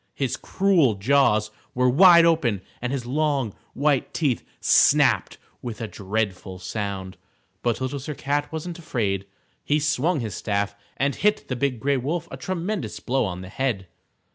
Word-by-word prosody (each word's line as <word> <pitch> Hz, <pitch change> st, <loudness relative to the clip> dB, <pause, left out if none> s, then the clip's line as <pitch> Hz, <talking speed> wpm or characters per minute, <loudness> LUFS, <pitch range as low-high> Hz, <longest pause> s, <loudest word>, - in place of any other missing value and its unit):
His 135 Hz, -4 st, -1 dB
cruel 175 Hz, -, +2 dB
jaws 110 Hz, -1 st, +3 dB, 0.2 s
were 125 Hz, 0 st, +3 dB
wide 170 Hz, +5 st, +7 dB
open 130 Hz, -, +2 dB, 0.2 s
and 125 Hz, 0 st, -2 dB
his 135 Hz, -3 st, -3 dB
long, 140 Hz, -4 st, 0 dB, 0.2 s
white 140 Hz, -1 st, +1 dB
teeth 140 Hz, -8 st, 0 dB, 0.2 s
snapped -, -, +4 dB, 0.2 s
with 120 Hz, -4 st, -6 dB
a 115 Hz, -, -3 dB
dreadful 95 Hz, -3 st, -3 dB
sound. 95 Hz, -1 st, -5 dB, 0.4 s
But 120 Hz, -2 st, 0 dB
Little 130 Hz, +2 st, -3 dB
Sir 145 Hz, +3 st, -6 dB
Cat 145 Hz, +2 st, -1 dB
wasn't 165 Hz, +2 st, -5 dB
afraid. 100 Hz, -, -2 dB, 0.4 s
He 150 Hz, +1 st, +2 dB
swung 155 Hz, +2 st, +1 dB
his 110 Hz, -5 st, -4 dB
staff 100 Hz, -1 st, -1 dB, 0.2 s
and 140 Hz, +1 st, +1 dB
hit 210 Hz, +7 st, +1 dB
the 130 Hz, -, -1 dB
Big 125 Hz, -1 st, -1 dB
Gray 140 Hz, +3 st, +1 dB
Wolf 160 Hz, +6 st, -2 dB
a -, -, -6 dB
tremendous 185 Hz, -, -3 dB
blow 130 Hz, -1 st, 0 dB
on 90 Hz, -2 st, -4 dB
the 95 Hz, -, -9 dB
head. 115 Hz, -5 st, -2 dB
130 Hz, 160 wpm, -24 LUFS, 105-150 Hz, 0.4 s, wide